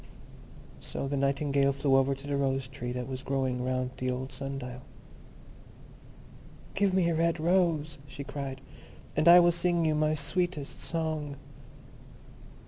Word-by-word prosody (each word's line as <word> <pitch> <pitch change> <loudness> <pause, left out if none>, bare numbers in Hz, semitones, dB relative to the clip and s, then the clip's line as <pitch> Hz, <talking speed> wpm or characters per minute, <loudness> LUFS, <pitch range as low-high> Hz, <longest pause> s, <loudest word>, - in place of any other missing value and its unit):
So - - -5
the 140 - -2
Nightingale 140 0 +2
flew 135 0 +2
over 135 +1 +3
to 135 +1 -12
the 145 0 -1
Rose 135 -1 0
tree 125 -2 -6
that 125 0 -4
was 130 -1 -5
growing 130 -2 -1
round 130 0 -1
the 130 - -2
old 130 +1 -3
sun 135 +1 -5
dial. 125 -1 -7 1.9
"Give 200 -1 +2
me 185 -2 +2
a - - 0
red 165 +1 +1
rose," 165 -4 +1
she 140 +1 -7
cried, 140 -1 -6 0.5
"and 155 +2 +2
I 175 +1 +10
will 175 0 +5
sing 170 0 +1
you 155 - +2
my 155 0 +2
sweetest 175 -2 -2
song." 155 -3 -2
140 Hz, 150 wpm, -29 LUFS, 135-160 Hz, 1.9 s, I